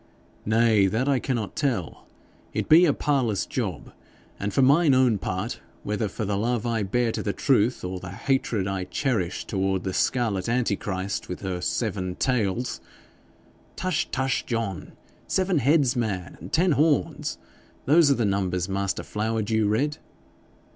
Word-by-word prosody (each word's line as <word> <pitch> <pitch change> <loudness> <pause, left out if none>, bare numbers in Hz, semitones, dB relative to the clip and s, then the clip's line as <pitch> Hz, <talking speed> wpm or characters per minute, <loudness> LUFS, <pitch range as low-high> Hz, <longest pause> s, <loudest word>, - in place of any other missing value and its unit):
'Nay, 110 -2 +4
that 115 +7 0
I 140 -2 +3
cannot 120 -6 -3
tell. 120 - -2 0.5
It - - -1
be 165 +3 +7
a 155 - +4
parlous 135 -8 0
job, - - -4 0.5
and 100 +1 -2
for 135 - +3
mine 145 +1 +5
own 125 -5 +3
part, 95 +5 -3 0.2
whether 105 +1 -1
for 105 +2 -4
the 100 0 -1
love 120 +1 0
I 115 -2 0
bear 115 +4 0
to - - -3
the 100 - -2
truth, 125 -3 +2
or 90 0 -4
the 90 - -8
hatred 110 -1 -1
I 95 -1 -2
cherish 100 -6 -1
toward 95 -2 -1
the 95 - -3
scarlet 115 -5 0
Antichrist, 100 -5 -1
with 90 - -5
her 95 -2 -3
seven 95 -3 -2
tails 125 -1 -1 0.5
' - - -31
'Tush, 185 -4 -1
tush, 130 0 0
John! 115 -7 -3 0.3
Seven 185 -3 +1
heads, 140 -1 +3
man, 100 -7 -2
and - - -9
ten 175 +2 +3
horns. 150 +1 +1 0.5
Those 155 +1 +5
are 140 - +4
the 120 - 0
numbers 95 -3 0
master 100 0 -2
Flowerdew 110 0 0
read.' 145 +8 0
110 Hz, 155 wpm, -25 LUFS, 95-130 Hz, 0.5 s, be